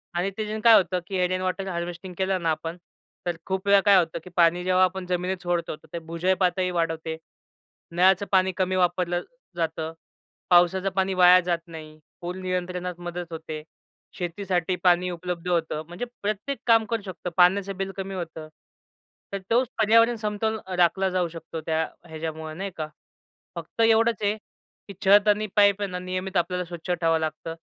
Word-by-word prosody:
आणि 180 +3 0
ते 215 0 -3
काय 230 -1 +8
होतं 180 -1 +3
की 185 -2 +1
रेन 185 +1 -2
वॉटर 185 +1 -2
हार्वेस्टिंग 175 0 -5
केलं 190 -1 0
ना 165 - 0
आपण, 165 +2 -4 0.5
तर 175 -1 -1
खूप 190 +1 -3
वेळा 200 0 +7
काय 200 -1 +7
होतं 170 -3 +1
की 180 - -11
पाणी 175 0 +4
जेव्हा 185 0 +3
आपण 185 0 0
जमिनीत 180 +1 -2
सोडतो, 175 -2 -1
तर - - -21
ते 170 - -3
भुजल 170 +3 0
पातळी 185 0 +1
वाढवते, 165 -2 -2 0.7
नळाचं 185 +3 +4
पाणी 190 -1 +4
कमी 185 -1 +1
वापरलं 175 -1 +1 0.3
जातं, 160 -1 -2 0.6
पावसाचं 180 +2 +4
पाणी 190 0 +1
वाया 180 0 +7
जात 170 -1 +1
नाही, 155 -2 -10 0.2
पूर 175 +1 -4
नियंत्रणात 180 -1 -3
मदत 175 0 -6
होते, 160 -1 -6 0.5
शेतीसाठी 180 0 -1
पाणी 180 0 +4
उपलब्ध 175 0 -5
होतं. 160 -3 0
म्हणजे 175 +8 -5 0.2
प्रत्येक 210 +7 -2
काम 225 -1 +5
करू 230 -2 -1
शकतं. 185 -1 -6
पाण्याचं 190 +2 +4
बिल 195 0 -3
कमी 195 0 -4
होतं. 165 -3 -6 0.9
तर 200 - -1
तोच 245 +2 +3
पर्यावरण 230 +2 +5
समतोल 220 0 -2
अ, 185 - -5
राखला 180 +2 +3
जाऊ 180 -1 0
शकतो 165 0 -7
त्या 160 0 +1 0.3
ह्याच्यामुळं 160 0 -6
नाही 195 +1 -4
का? 155 -1 -3 0.7
फक्त 170 +6 -5
एवढंच 225 0 +3
आहे, 205 0 +2 0.5
की 200 - -8
छत 205 +2 +6
आणि 210 +1 +3
पाईप 205 -1 +5
आहे 200 - -1
ना, 180 - -3
नियमित 185 +1 -3
आपल्याला 180 +1 0
स्वच्छ 170 +1 -9
ठेवावं 165 -2 +2
लागतं, 160 +1 -4
180 Hz, 175 wpm, -25 LUFS, 170-195 Hz, 0.9 s, काय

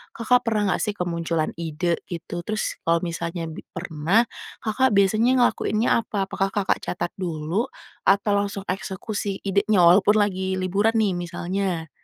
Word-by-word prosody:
Kakak 245 +1 +2
pernah 210 -3 +1
nggak, - - -2
sih, 210 - 0
kemunculan 170 -3 -1
ide, 170 +1 -1
itu? 175 0 -5
Terus, 215 0 -2
kalau 165 0 +3
misalnya 170 -1 -3
bi - - -9
pernah, 170 +5 +1 0.4
Kakak 235 +2 +2
biasanya 220 +6 +4
ngelakuinnya 220 -1 +1 0.2
apa? 200 -2 -1
Apakah 195 0 0
Kakak 200 -2 +1
catat 175 0 -3
dulu, 175 +6 -2 0.4
atau 200 +1 +4
langsung 200 -1 -2
eksekusi 195 +1 -3
idenya, 200 -1 +3
walaupun 190 +5 +6
lagi 190 -2 +1
liburan, 205 +5 +1
nih, 215 -3 +3
misalnya? 175 -1 -3
195 Hz, 145 wpm, -24 LUFS, 170-210 Hz, 0.4 s, walaupun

